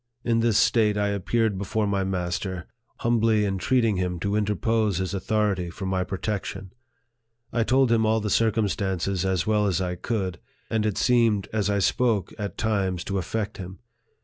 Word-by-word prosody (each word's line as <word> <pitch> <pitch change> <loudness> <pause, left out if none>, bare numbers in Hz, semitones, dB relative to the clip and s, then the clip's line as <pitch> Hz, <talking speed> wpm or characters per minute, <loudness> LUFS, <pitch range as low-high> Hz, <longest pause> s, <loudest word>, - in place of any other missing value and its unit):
In 115 -1 +2
this 115 -2 +2
state 105 -3 +3
I 105 0 +1
appeared 100 +1 0
before 105 +2 -1
my 100 -1 0
master, 95 -1 -3 0.4
humbly 115 -2 +2
entreating 110 +2 +1
him 90 -1 -2
to 100 0 -1
interpose 105 -1 +1
his 95 +1 -2
authority 100 -2 0
for 95 +3 -7
my 95 -1 0
protec 100 +2 -3
tion. 95 -1 -7 0.8
I 120 - +1
told 130 +1 +3
him 115 -1 +3
all 110 +1 +2
the 105 -1 -3
circumstances 100 -4 0
as 95 -2 0
well 105 -1 +2
as 90 -4 +1
1 90 -1 -2
could, 95 -7 -2 0.3
and 110 -1 +1
it 105 - -2
seemed, 115 -5 +2
as 105 -2 0
I 100 - +1
spoke, 105 -1 +1
at 100 -1 -4
times 95 -5 0
to 100 -1 -2
affect 105 +4 -3
him. 95 0 -8
105 Hz, 175 wpm, -25 LUFS, 95-110 Hz, 0.8 s, state